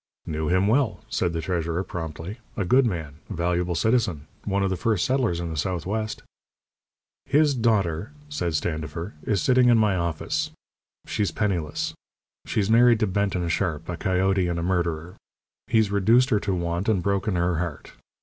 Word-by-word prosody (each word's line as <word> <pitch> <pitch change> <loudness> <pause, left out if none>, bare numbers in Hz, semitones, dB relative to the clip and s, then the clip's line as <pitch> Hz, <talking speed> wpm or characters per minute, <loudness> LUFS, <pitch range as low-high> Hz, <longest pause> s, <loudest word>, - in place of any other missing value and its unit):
"Knew 80 0 -2
him 95 +3 +3
well," 125 +1 +2
said 85 - +1
the 85 -1 -2
treasurer, 85 +1 -1
promptly. 85 - -6 0.2
"A 100 - 0
good 125 +6 +4
man. 80 -7 -4
A - - -4
valuable 85 +1 0
citizen. 95 -7 +1 0.2
One 100 -1 +1
of 95 - 0
the - - +1
first 100 0 +1
settlers 125 -10 +1
in 85 -1 -3
the - - -4
Southwest." 95 +7 -2 1.0
"His 145 +1 +4
daughter," 105 - +1 0.2
said 90 - -2
Standifer, 80 +4 -3
"is 100 -4 0
sitting 125 -1 +5
in 120 - +6
my 105 -3 +3
office. 90 - -1 0.6
She's 105 -3 0
penniless. 80 -4 -1 0.5
She's 100 -2 0
married 115 +1 +5
to - - +4
Benton 95 -3 0
Sharp, 85 -4 -1
a 90 - -2
coyote 95 0 +1
and 85 -1 -1
a 85 - -2
murderer. 85 -2 -1 0.5
He's 110 -3 +2
reduced 115 +6 +4
her 105 - +4
to 100 -2 -1
want, 85 +3 -1
and 95 -5 +2
broken 100 0 0
her 85 -1 +1
heart. 85 -4 -5
95 Hz, 170 wpm, -25 LUFS, 85-110 Hz, 1.0 s, in